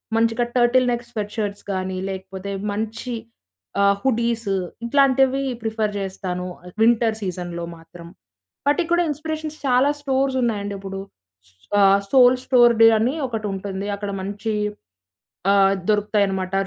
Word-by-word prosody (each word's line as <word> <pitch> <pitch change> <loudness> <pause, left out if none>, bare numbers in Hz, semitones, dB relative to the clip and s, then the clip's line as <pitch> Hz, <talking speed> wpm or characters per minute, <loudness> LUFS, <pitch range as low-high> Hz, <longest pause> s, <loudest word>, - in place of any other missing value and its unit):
మంచిగా 230 +1 +2
turtle 250 +1 +4
neck 240 0 -2
sweat 210 -3 -5
shirts 205 -2 -3
గానీ, 185 0 -3 0.2
లేపోతే 190 +1 -6 0.2
మంచి 225 +3 -4 0.7
ఆహ్, 200 0 +4
హుడీస్ 235 -3 0 0.4
ఇట్లాంటివి 270 0 +3 0.2
ప్రిఫర్ 220 -1 -1
జేస్తాను 185 -2 -4 0.4
వింటర్ 230 -1 +4
సీజన్‌లో 175 -2 -4
మాత్రం. 170 +1 -13 0.6
వాటికి 325 +4 +2
కూడా 345 0 +4
ఇన్‌స్పిరేషన్స్ 310 +1 -4
చాలా 255 +1 +4
స్టోర్సున్నాయండిప్పుడు. 230 -8 -1 0.8
ఆహ్, 195 0 +6
సోల్ 255 -1 +6
స్టోర్‌డే 240 -3 +6
అని 250 +6 +1
ఒకటుంటుంది. 200 -3 -4
అక్కడ 200 0 -5
మంచి 205 +3 -3 1.0
ఆహ్, 195 -1 +5 0.2
దొరుకుతాయనమాట 200 -3 +1
220 Hz, 110 wpm, -22 LUFS, 195-250 Hz, 1.0 s, ఆహ్